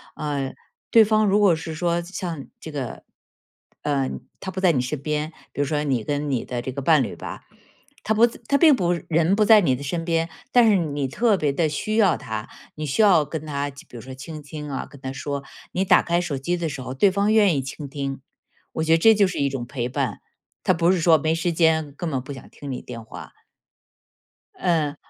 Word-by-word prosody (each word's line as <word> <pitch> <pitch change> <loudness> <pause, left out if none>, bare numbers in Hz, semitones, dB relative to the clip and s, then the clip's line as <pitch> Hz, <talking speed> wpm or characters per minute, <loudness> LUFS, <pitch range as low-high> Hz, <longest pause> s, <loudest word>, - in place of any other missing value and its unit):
呃， 140 -3 -3 0.4
对 225 -1 +8
方 215 0 +3
如 205 +1 +3
果 195 -5 +5
是 160 0 -6
说 170 +1 0
像 170 -5 -5
这 160 - -8
个， 135 -6 -5 0.8
呃， 140 -3 0 0.3
他 190 - -5
不 190 - -5
在 185 -2 +5
你 140 - 0
身 135 +2 -4
边， 150 +1 -2 0.2
比 - - -9
如 145 - +2
说 150 +1 -1
你 130 -6 0
跟 145 +4 -2
你 130 -4 -1
的 120 -1 -4
这 130 - -5
个 140 +2 -5
伴 155 -1 +5
侣 - - -5
吧， - - -8 0.6
他 220 - +1
不 225 +2 +5
在 235 - -11
他 280 - +3
并 315 -4 +7
不 175 -7 0 0.2
人 165 +3 +3
不 215 - +3
在 220 -1 +7
你 135 -8 +2
的 125 - -9
身 165 +4 -3
边， 165 0 0 0.2
但 240 -2 +6
是 210 - +5
你 145 -5 -1
特 220 - +2
别 145 -4 +1
地 160 +1 +1
需 215 +8 -2
要 200 -6 +4
他， 110 0 -5 0.3
你 155 - -4
需 150 +9 +1
要 180 -8 +5
跟 155 +1 -5
他 145 -1 -2
比 140 - -14
如 115 - -8
说 130 +3 -9
倾 150 +4 -8
听 150 0 -7
啊， 135 - -4
跟 140 - -15
他 130 - -4
说。 140 +2 -4 0.3
你 185 - 0
打 - - +6
开 170 +1 +1
手 155 -6 -3
机 175 +7 -1
的 170 -2 -2
时 140 -3 -6
候， 130 - -5
对 190 +9 +4
方 200 +3 +1
愿 205 -6 +5
意 - - 0
倾 140 +2 -7
听， 135 -1 -4 0.5
我 160 - -1
觉 160 - 0
得 - - +6
这 220 +5 +6
就 205 - +4
是 - - -4
一 140 - +2
种 135 -3 -4
陪 120 -2 -4
伴， 130 -5 -2 0.4
它 - - +3
不 170 +1 +3
是 185 - +1
说 165 -1 +6
没 155 +2 0
时 165 +1 0
间， 160 -3 +2
根 170 -2 -3
本 135 -2 -1
不 135 - -9
想 130 - -11
听 140 -1 -8
你 125 - -4
电 115 -2 -8
话。 110 - -11 1.3
嗯。 160 -5 +1
155 Hz, 250 characters per minute, -23 LUFS, 140-175 Hz, 1.3 s, 对